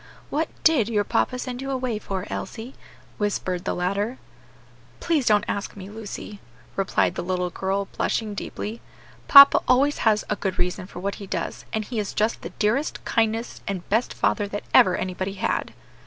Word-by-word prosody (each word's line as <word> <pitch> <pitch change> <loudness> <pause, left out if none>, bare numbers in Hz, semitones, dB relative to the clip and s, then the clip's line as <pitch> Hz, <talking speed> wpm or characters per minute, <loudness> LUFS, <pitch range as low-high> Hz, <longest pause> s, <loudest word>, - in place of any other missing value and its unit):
"What 315 +3 0
did 275 -10 +4
your 210 -3 +2
papa 255 - 0
send 250 0 -5
you 270 - -4
away 255 -5 -1
for, 195 -2 -4
Elsie?" 240 +3 -6 0.5
whispered 185 -3 -1
the - - -1
latter. 200 +7 -1 0.8
"Please 310 -7 +1
don't 210 -1 +5
ask 200 - -3
me, 195 0 -9
Lucy," 210 -1 -7 0.4
replied 195 0 +1
the - - -3
little 180 0 -1
girl, 195 +3 -1
blushing 215 -2 -1
deeply. 210 +2 -5 0.5
"Papa 280 0 +10
always 275 +4 +3
has 215 -2 +2
a 210 - 0
good 190 -2 -2
reason 180 +1 -1
for 175 - -9
what 200 +2 -2
he 200 - -7
does, - - -4
and 220 -1 -2
he 230 0 -3
is 205 - -3
just 215 +2 +1
the - - -6
dearest, 235 +8 -1
kindest, 225 +1 0
and 190 -4 -4
best 225 +4 +1
father 205 -2 +1
that 205 +1 -5
ever 185 - +6
anybody 185 +1 -3
had." 195 - -1
210 Hz, 175 wpm, -24 LUFS, 195-240 Hz, 0.8 s, Papa